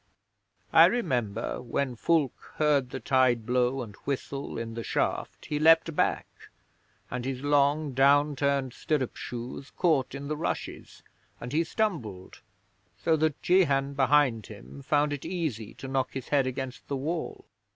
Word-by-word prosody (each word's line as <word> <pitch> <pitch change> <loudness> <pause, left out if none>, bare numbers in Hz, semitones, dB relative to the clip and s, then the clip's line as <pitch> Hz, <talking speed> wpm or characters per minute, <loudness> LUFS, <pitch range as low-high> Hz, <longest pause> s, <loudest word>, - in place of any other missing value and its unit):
I - - +9
remember 120 - -1
when 125 +1 -2
Fulke 150 +1 0
heard 145 -4 +2
the 130 - -5
tide 130 -4 +2
blow 125 +1 +1
and 105 -3 -10
whistle 140 0 -4
in 115 0 -5
the 115 0 -5
shaft - - -2
he 150 - -2
leaped 165 0 +5
back, - - +1 0.9
and 125 -1 -3
his 130 0 -4
long 145 0 +2
down 140 +3 +4
turned 140 -2 0
stirrup 145 -5 -1
shoes 125 +3 -7
caught 145 -7 +1
in 140 +1 -6
the 150 - -2
rushes 160 +3 -5 0.4
and 125 +3 -7
he 160 +2 +3
stumbled, 140 - -3 0.6
so 160 - +2
that 155 -1 0
Jehan 140 -7 +3
behind 135 -5 +3
him 70 +3 -11
found 145 - +1
it 145 - -5
easy 145 - -4
to 135 - -8
knock 130 -1 -1
his 130 - -6
head 140 -3 +2
against 130 0 -5
the 140 - -2
wall.' 160 +5 -4
135 Hz, 150 wpm, -28 LUFS, 125-150 Hz, 0.9 s, I